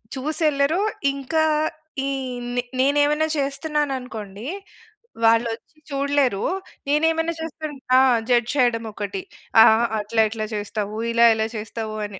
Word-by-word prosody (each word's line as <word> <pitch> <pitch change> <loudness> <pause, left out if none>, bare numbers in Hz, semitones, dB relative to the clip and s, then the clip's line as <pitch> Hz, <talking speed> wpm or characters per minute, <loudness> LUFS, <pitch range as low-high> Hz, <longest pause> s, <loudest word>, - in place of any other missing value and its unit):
చూసెళ్ళరు. 305 +3 +1 0.3
ఇంకా 295 +4 0 0.6
ఈ - - 0 0.5
నె 245 - 0 0.2
నేనేవన్నా 290 +3 +3
చేస్తన్నాననుకోండి, 270 -7 -3 0.8
వాళ్ళొచ్చి 230 +6 +1
చూడలేరు. 275 -6 +1 0.5
నేను 300 +2 +3
ఏమన్నా 325 +1 -1
చేస్తుంట్ 310 -3 -6 0.2
ఆ! - - +8 0.3
జడ్జ్ 240 0 +3
చేయడమొకటి. 220 -6 -1 0.4
"అహహ! 220 +1 +6 0.2
అట్లేలెట్ల 220 +1 0
చేస్తావు. 210 0 -4
ఇలా 235 0 +5
ఎలా 220 0 0
చేస్తావు" 215 0 -5
అని. 195 -2 -10
250 Hz, 105 wpm, -22 LUFS, 220-290 Hz, 0.8 s, ఆ